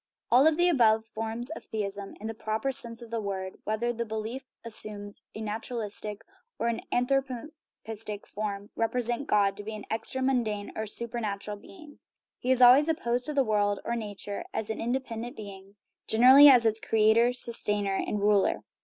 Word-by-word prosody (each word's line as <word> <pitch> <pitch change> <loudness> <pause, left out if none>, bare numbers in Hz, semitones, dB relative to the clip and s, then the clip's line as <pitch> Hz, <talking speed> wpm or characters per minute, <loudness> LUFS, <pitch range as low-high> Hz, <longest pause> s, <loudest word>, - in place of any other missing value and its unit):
All 270 +6 +6
the 350 +3 +2
above 225 -9 +3
forms 225 +4 -4
of - - -8
theism, 200 -2 -5
in 210 - -9
the 225 - -3
proper 220 +4 -2
sense 235 -3 -1
of 230 - -13
the 230 -1 -2
word 190 -2 -5
whether 220 +3 -1
the 235 0 -3
belief 220 +4 -5 0.2
assumes 210 -2 -3
a 220 - -6
naturalistic 215 -1 -4 0.3
or 235 - 0
an 230 - -3
anthropistic 245 -5 -3
form 205 -1 -5
represent 240 +3 -1
God 200 -1 +2
to 205 - -7
be 215 +1 -6
an 210 - -9
extra 225 +4 -2
mundane 225 -6 -1
or - - -3
a 220 - -4
supernatural 210 -3 -4
being. 300 - -15 0.4
He 250 - -4
is 255 -1 +4
always 265 +6 +7
op 320 - +1
posed 240 +3 -1
to 300 - -3
the 275 - +4
world, 205 -3 +1
or 235 - -1
nature, 205 -2 -5
as 220 0 -2
an - - -5
independent 240 0 -3
being; 200 -2 -10 0.3
generally 260 +6 +8
as 245 -4 +6
its 220 0 +3
creator, 225 +3 +3
sustainer, 210 -5 +3
and 210 - -2
ruler. 205 -1 +2
225 Hz, 175 wpm, -28 LUFS, 210-245 Hz, 0.4 s, generally